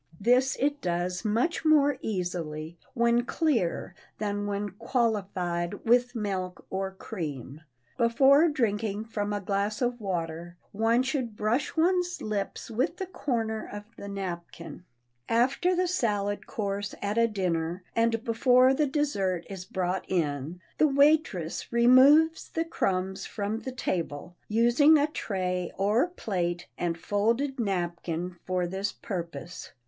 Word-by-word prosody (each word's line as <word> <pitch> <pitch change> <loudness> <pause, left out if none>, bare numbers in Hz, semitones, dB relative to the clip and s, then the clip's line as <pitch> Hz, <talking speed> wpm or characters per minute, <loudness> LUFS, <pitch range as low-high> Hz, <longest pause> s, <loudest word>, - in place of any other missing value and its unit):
This 250 +5 +3
it 285 +1 0
does 180 +2 -2
much 230 +12 0
more 290 -3 +4
easily 170 -5 -4 0.2
when 235 0 +3
clear 250 - 0 0.2
than 205 -1 -2
when 205 0 -2
"qualified" 195 -5 -1
with 245 +2 +3
milk 190 -4 -3
or 190 0 -1
cream. 155 - -6 0.4
Before 270 +7 +5
drinking 215 -5 -1
from 210 -2 -3
a 205 - -1
glass 200 +2 -1
of 245 -1 -1
water 170 -2 -4
one 225 +4 +2
should 260 -5 -2
brush 240 +9 0
one's 360 +2 +2
lips 205 0 -4
with 260 +10 0
the 380 - -3
corner 230 -11 -2
of 205 0 -6
the 200 - -8
napkin. 180 -3 -6 0.4
After 270 +10 +2
the 365 +1 +1
salad 205 - -1
course 200 -1 -3
at 205 +3 -1
a 230 - +5
dinner, 180 -4 -2
and 230 0 +1
before 250 +2 +4
the 295 +2 +1
dessert 200 - -1
is 185 -2 -6
brought 185 -2 -2
in, 155 -1 -1 0.2
the 310 - +6
waitress 280 - +2
removes 265 +7 +5
the 330 0 -1
crumbs 190 - -1
from 210 +2 -3
the 260 - -6
table, 175 - -3
using 240 +8 +5
a 290 - +3
tray 180 - -2
or 210 - +2
plate 175 - -3
and 170 -1 -2
folded 230 +9 0
napkin 175 -3 -2
for 180 -1 0
this 190 +3 -2
purpose. 175 -2 -6
210 Hz, 135 wpm, -28 LUFS, 180-250 Hz, 0.4 s, the